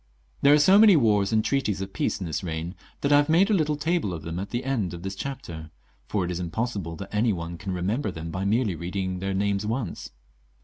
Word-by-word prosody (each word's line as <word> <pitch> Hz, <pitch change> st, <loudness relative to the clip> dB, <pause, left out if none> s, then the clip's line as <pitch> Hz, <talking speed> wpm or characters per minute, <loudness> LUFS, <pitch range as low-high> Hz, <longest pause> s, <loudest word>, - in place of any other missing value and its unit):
There 140 Hz, +1 st, +7 dB
are -, -, +5 dB
so 190 Hz, +7 st, +6 dB
many 210 Hz, -3 st, +8 dB
wars 105 Hz, -7 st, +3 dB
and 110 Hz, -1 st, +2 dB
treaties 120 Hz, -8 st, 0 dB
of 95 Hz, 0 st, -6 dB
peace -, -, -1 dB
in 95 Hz, -, -4 dB
this 80 Hz, +1 st, -3 dB
reign, 85 Hz, 0 st, -4 dB, 0.3 s
that 140 Hz, -, +1 dB
I 145 Hz, -, +7 dB
have 145 Hz, +1 st, +2 dB
made 185 Hz, +6 st, +4 dB
a -, -, +4 dB
little 155 Hz, -5 st, +2 dB
table 150 Hz, -, -1 dB
of 80 Hz, -, -8 dB
them 85 Hz, +2 st, -4 dB
at 100 Hz, -, -5 dB
the 120 Hz, +1 st, -3 dB
end 110 Hz, -10 st, -1 dB
of 85 Hz, -, -10 dB
this 95 Hz, 0 st, -4 dB
chapter, 95 Hz, -10 st, -6 dB, 0.4 s
for 100 Hz, -4 st, 0 dB
it 90 Hz, -, -3 dB
is 90 Hz, -, -3 dB
impossible 90 Hz, -1 st, -3 dB
that 100 Hz, +3 st, -9 dB
any 110 Hz, +2 st, +2 dB
one 85 Hz, -1 st, -5 dB
can 95 Hz, +3 st, -6 dB
remem 95 Hz, +8 st, -1 dB
ber 120 Hz, -, -2 dB
them 80 Hz, -2 st, -6 dB
by 90 Hz, +3 st, -3 dB
merely 105 Hz, 0 st, +1 dB
reading 90 Hz, +2 st, -3 dB
their 95 Hz, +1 st, -2 dB
names 100 Hz, +1 st, 0 dB
once. 110 Hz, -3 st, -3 dB
100 Hz, 250 wpm, -26 LUFS, 90-135 Hz, 0.4 s, many